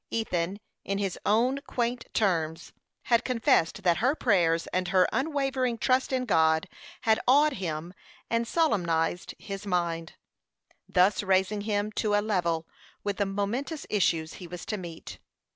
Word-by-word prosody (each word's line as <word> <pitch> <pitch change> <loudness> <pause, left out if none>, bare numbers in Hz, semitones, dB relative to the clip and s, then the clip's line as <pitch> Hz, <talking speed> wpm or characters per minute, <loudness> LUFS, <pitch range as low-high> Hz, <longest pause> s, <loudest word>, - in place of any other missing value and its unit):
Ethan, 195 -4 -2 0.2
in 195 - -2
his 195 -2 -2
own 245 +6 +3
quaint 240 0 -2
terms, 165 -5 -1 0.3
had 235 0 +3
confessed 220 -7 +1
that 175 -2 +3
her 260 +6 +2
prayers 170 - +2
and 185 0 0
her 185 -1 +4
unwavering 270 -4 0
trust 255 +4 +1
in 255 -1 0
God 160 -6 +3 0.3
had 220 -2 +3
awed 290 +3 +5
him 170 -3 -4 0.3
and 230 0 0
solemnized 175 - 0
his 195 0 -7
mind, 170 -3 -1 0.8
thus 185 +2 +3
raising 190 +1 +1
him 205 0 -1
to 210 -1 0
a - - +4
level 175 -6 -1 0.4
with 205 -1 -2
the 200 - 0
momentous 235 +10 -3
issues 165 -5 +1
he 180 - -9
was 175 +1 -8
to 215 - -2
meet. 170 -3 -9
200 Hz, 145 wpm, -28 LUFS, 175-235 Hz, 0.8 s, awed